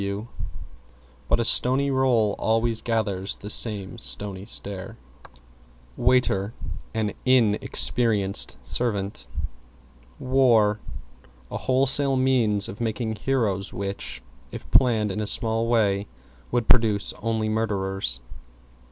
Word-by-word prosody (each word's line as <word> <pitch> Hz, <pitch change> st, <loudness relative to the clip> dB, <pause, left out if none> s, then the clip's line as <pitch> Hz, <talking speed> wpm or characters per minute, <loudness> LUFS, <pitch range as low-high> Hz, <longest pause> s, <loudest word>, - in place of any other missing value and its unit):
W 100 Hz, +3 st, -4 dB, 1.0 s
But -, -, +3 dB
a 115 Hz, -, 0 dB
stony 135 Hz, +4 st, +2 dB
roll 125 Hz, -6 st, +2 dB
always 115 Hz, 0 st, +1 dB
gathers 105 Hz, -5 st, -2 dB
the 105 Hz, -, -6 dB
stony 100 Hz, -2 st, -2 dB
stare. 100 Hz, +2 st, -3 dB, 1.0 s
=WAITER= 115 Hz, -4 st, +1 dB, 0.4 s
An 110 Hz, -2 st, -1 dB
Inn 120 Hz, -5 st, +3 dB
experienced 100 Hz, -, +2 dB
servant. 100 Hz, -, -2 dB, 0.9 s
=WAR= 120 Hz, -5 st, +3 dB, 0.7 s
A -, -, -3 dB
wholesale 135 Hz, +1 st, +3 dB
means 120 Hz, -6 st, +3 dB
of 100 Hz, -, -8 dB
making 110 Hz, 0 st, -2 dB
heroes 105 Hz, -5 st, -1 dB
which, 65 Hz, -11 st, -5 dB, 0.3 s
if -, -, -8 dB
planned 110 Hz, -5 st, +3 dB
in 105 Hz, -, -3 dB
a 105 Hz, -, -1 dB
small 115 Hz, +1 st, 0 dB
way, 105 Hz, -4 st, +1 dB, 0.4 s
would 120 Hz, -2 st, -1 dB
produce 110 Hz, -4 st, +3 dB
only 110 Hz, -1 st, -1 dB
murderers. 95 Hz, -, -2 dB
110 Hz, 105 wpm, -24 LUFS, 100-120 Hz, 1.0 s, But